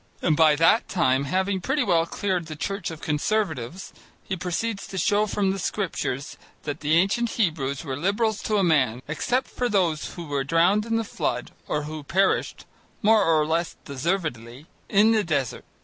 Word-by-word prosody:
And 155 - +3
by 155 -1 +5
that 165 +9 +3
time, 140 -7 +2
having 190 +5 0
pretty 270 +7 0
well 170 -6 +2
cleared 185 -4 -2
the 155 - -6
church 195 +4 -3
of 160 -2 -8
Conservatives, 160 - -2 0.3
he 190 - -3
proceeds 195 +4 -3
to 190 - -7
show 205 +4 +2
from 195 -1 0
the 195 - -3
scriptures 145 -9 -3 0.3
that 145 0 -4
the 155 +1 +1
ancient 200 +7 +2
Hebrews 150 - -1
were 135 -3 -3
Liberals 205 - 0
to 215 - +1
a 195 - +3
man, 130 -8 +2
except 240 - -1
those 190 -10 0
who 175 - -6
were 145 -2 -1
drowned 175 +9 +2
in 225 - 0
the 225 - +1
flood 125 - -3 0.2
or 150 - -1
who 155 +1 -6
perished, 190 +7 0 0.4
more 215 0 +5
or 160 -3 +3
less 165 +2 -1
deservedly, 140 -4 -3 0.2
in 210 +2 +5
the 220 -2 +3
desert. 145 - -2
170 Hz, 175 wpm, -25 LUFS, 150-200 Hz, 0.4 s, by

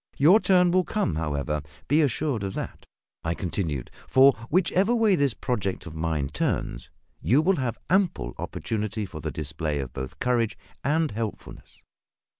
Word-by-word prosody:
"Your 170 +10 +7
turn 180 -4 +4
will 185 +1 +3
come, 210 - -1
however, 75 -1 -1 0.3
be 150 +4 +4
assured 140 -3 0
of 95 -1 -4
that," - - -6 0.4
I 85 0 -1
continued; 80 -8 -3 0.2
"for, 135 +1 +6 0.2
whichever 185 +6 +3
way 220 -4 +4
this 140 -7 +1
project 100 -7 -2
of 85 - -8
mine 80 -3 -1
turns, 65 -4 -2 0.3
you 130 +6 +4
will 180 +4 +3
have 125 -4 -2
ample 175 - +1
opportunity 110 0 -3
for 80 -5 -8
the - - -3
display 75 0 -3
of 65 -3 -4
both 65 - -6
courage 120 -3 0 0.3
and 155 +2 +1
helpfulness. 110 0 -7
115 Hz, 155 wpm, -26 LUFS, -, 0.4 s, Your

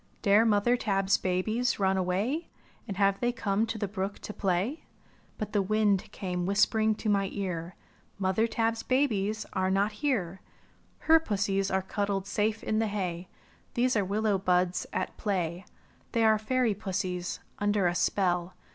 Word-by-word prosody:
"Dare 205 +3 +5
mother 220 +2 +3
Tab's 195 -5 +1
babies 215 +7 0
run 190 -1 +2
away. 195 - -1 0.4
And 200 -3 -5
have 195 -1 +3
they 240 0 +1
come 215 -2 0
to 225 - -3
the 205 -1 -2
brook 195 0 -3
to 210 - -6
play?" 195 - -1 0.5
But 215 0 -5
the 205 - +3
wind 205 -1 +1
came 180 -2 -3
whispering 215 +2 +3
to 215 - -5
my 200 -2 +2
ear: 180 -3 -4 0.4
"Mother 195 +3 +1
Tab's 225 0 0
babies 220 -5 0
are 185 0 +1
not 200 +2 +2
here. 210 - -2 0.6
PUSSIES. - - -17
39 325 0 +8
^^Her - - -21
pussies 195 -2 0
are 190 - +2
cuddled 200 0 -2
safe 215 +2 -1
in 215 - 0
the 225 - +1
hay, 185 -4 -3 0.5
These 250 +1 +2
are 205 - +3
willow 205 +1 0
buds 180 -1 +1
at - - -3
play. 180 -3 -2 0.5
They 230 - +2
are 220 -1 +4
fairy 240 0 +1
pussies, 185 -2 -3 0.2
under 205 -1 +1
a 175 - +2
spell. 180 -1 0
200 Hz, 165 wpm, -29 LUFS, 190-220 Hz, 0.6 s, 39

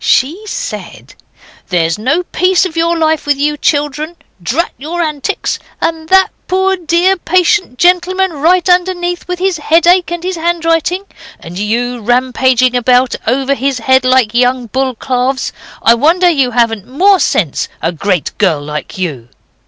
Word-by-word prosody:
She 310 +10 +1
said - - -7 0.5
'There's 165 0 0
no 285 +11 0
peace 365 +1 +1
of 350 -3 -6
your 335 +1 +1
life 315 -2 0
with 290 -1 +2
you 295 +1 0
children. 295 +2 -1 0.3
Drat 285 - -1
your 320 +5 -5
antics! 305 -4 -2 0.2
And 320 -1 -3
that 380 0 +4 0.2
poor, 380 +1 +1
dear, 355 +2 +1
patient 365 - +1
gentleman 365 +2 +2
right 335 +5 +2
underneath, 355 -1 0
with 360 0 -3
his 375 -1 0
headache 340 +3 +3
and 345 0 -5
his 370 -1 -3
handwriting: 335 +2 0 0.4
and 175 +3 -8
you 240 +4 -1
rampaging 255 +1 +2
about 250 +1 +2
over 270 +3 +1
his 275 -1 -1
head 260 +2 +2
like 255 -4 +2
young 250 +1 +1
bull 260 +2 -2
calves. 255 +2 -2 0.3
I 230 - +6
wonder 335 +9 +3
you 275 -6 +1
haven't 230 -3 0
more 370 +9 +3
sense, 165 - 0
a 165 - -1
great 180 0 -2
girl 180 -7 +2
like 150 +4 -6
you. 140 -11 -4
290 Hz, 150 wpm, -13 LUFS, 245-350 Hz, 0.5 s, I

